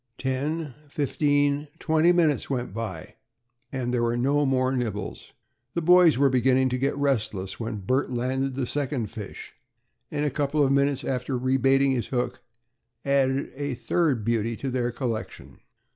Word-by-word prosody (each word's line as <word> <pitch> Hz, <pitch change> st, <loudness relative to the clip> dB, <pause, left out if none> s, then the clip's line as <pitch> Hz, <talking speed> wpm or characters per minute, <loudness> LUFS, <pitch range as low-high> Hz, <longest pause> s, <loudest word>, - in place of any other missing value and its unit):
Ten, 145 Hz, +3 st, -2 dB
fifteen, 145 Hz, 0 st, +1 dB
twenty 160 Hz, +2 st, +3 dB
minutes 165 Hz, -5 st, +2 dB
went 125 Hz, -6 st, -2 dB
by, 105 Hz, -7 st, -6 dB, 0.5 s
and 125 Hz, -2 st, -2 dB
there 120 Hz, -, +1 dB
were 120 Hz, 0 st, +1 dB
no 140 Hz, +3 st, +2 dB
more 130 Hz, -1 st, +2 dB
nibbles. 110 Hz, -5 st, -4 dB, 0.4 s
The 170 Hz, -, -1 dB
boys 175 Hz, -3 st, +6 dB
were 140 Hz, +1 st, +4 dB
beginning 130 Hz, +1 st, +3 dB
to 125 Hz, 0 st, -2 dB
get 140 Hz, +2 st, 0 dB
restless, 110 Hz, -9 st, -1 dB
when 110 Hz, -3 st, -4 dB
Bert 130 Hz, +8 st, 0 dB
landed 130 Hz, +2 st, -1 dB
the 135 Hz, -1 st, -1 dB
second 130 Hz, -4 st, -2 dB
fish, 105 Hz, -4 st, -8 dB, 0.6 s
and, 145 Hz, -, -1 dB
a 145 Hz, -, 0 dB
couple 145 Hz, +2 st, +1 dB
of 135 Hz, -, +2 dB
minutes 140 Hz, 0 st, +2 dB
after 130 Hz, 0 st, -2 dB
re 130 Hz, +1 st, +1 dB
baiting 135 Hz, +1 st, +3 dB
his 120 Hz, -4 st, -1 dB
hook, 125 Hz, -1 st, -2 dB, 0.6 s
added 140 Hz, 0 st, +1 dB
a 145 Hz, -1 st, -3 dB
third 135 Hz, -5 st, 0 dB
beauty 115 Hz, 0 st, 0 dB
to 135 Hz, +3 st, -4 dB
their 125 Hz, -1 st, 0 dB
collection. 120 Hz, -3 st, -5 dB
130 Hz, 160 wpm, -26 LUFS, 120-145 Hz, 0.6 s, boys